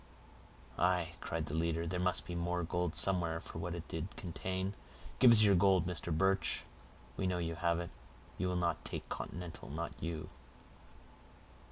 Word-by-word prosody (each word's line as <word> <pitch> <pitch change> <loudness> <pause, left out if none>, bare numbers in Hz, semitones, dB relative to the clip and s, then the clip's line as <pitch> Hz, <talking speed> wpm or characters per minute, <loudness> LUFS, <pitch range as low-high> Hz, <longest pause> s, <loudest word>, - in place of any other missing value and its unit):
"Aye," 90 -1 +2
cried 80 -1 -2
the 75 - -6
leader, 85 +1 0
"there 90 +2 -2
must 90 -1 +2
be 85 - -5
gold 85 -1 -1
somewhere 85 -1 +1
for 80 - -8
what 85 +1 -3
it 85 -1 -7
did 80 +5 -5
contain. 95 +2 -3 0.5
Give 130 - +9
us 110 -2 +9
your 100 -2 +6
gold, 95 -1 +5
Mr. 85 -1 -2
Birch; 95 +4 +2 0.5
we 95 - 0
know 90 -1 0
you 85 -1 -1
have 85 0 +1
it; 85 0 -5 0.5
you 90 - +1
will 90 - 0
not 85 -1 0
take - - -5
continental, 90 -1 -6
not 80 +3 -3
you." 80 -2 -3
85 Hz, 165 wpm, -35 LUFS, 85-90 Hz, 0.5 s, Give